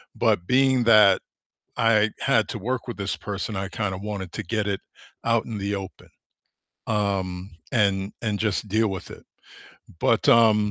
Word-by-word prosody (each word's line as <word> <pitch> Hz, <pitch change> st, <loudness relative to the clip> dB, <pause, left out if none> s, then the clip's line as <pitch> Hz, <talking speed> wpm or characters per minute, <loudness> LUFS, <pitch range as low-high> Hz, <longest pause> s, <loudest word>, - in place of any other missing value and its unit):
but 85 Hz, -, +1 dB
being 130 Hz, -1 st, +3 dB
that 105 Hz, -4 st, +6 dB, 0.6 s
I 110 Hz, -2 st, +3 dB
had 115 Hz, -6 st, +2 dB
to -, -, -4 dB
work 125 Hz, +4 st, -3 dB
with 120 Hz, -, -5 dB
this 100 Hz, -1 st, -3 dB
person, 105 Hz, +1 st, -5 dB
I 95 Hz, 0 st, -3 dB
kinda 100 Hz, -4 st, -3 dB
wanted 100 Hz, -3 st, -6 dB
to -, -, -4 dB
get 105 Hz, +3 st, -2 dB
it 100 Hz, -, -2 dB, 0.4 s
out 115 Hz, -1 st, +2 dB
in 115 Hz, -3 st, -5 dB
the 100 Hz, +1 st, -2 dB
open, 95 Hz, -1 st, -9 dB, 0.8 s
um, 95 Hz, -3 st, -2 dB, 0.2 s
and 100 Hz, -3 st, +1 dB
and 105 Hz, -3 st, -1 dB
just 105 Hz, -1 st, -1 dB
deal 110 Hz, +3 st, +2 dB
with 95 Hz, -2 st, -6 dB
it. -, -, -12 dB, 0.8 s
But, -, -, +2 dB
um, 110 Hz, -2 st, +5 dB
105 Hz, 165 wpm, -24 LUFS, 95-115 Hz, 0.8 s, that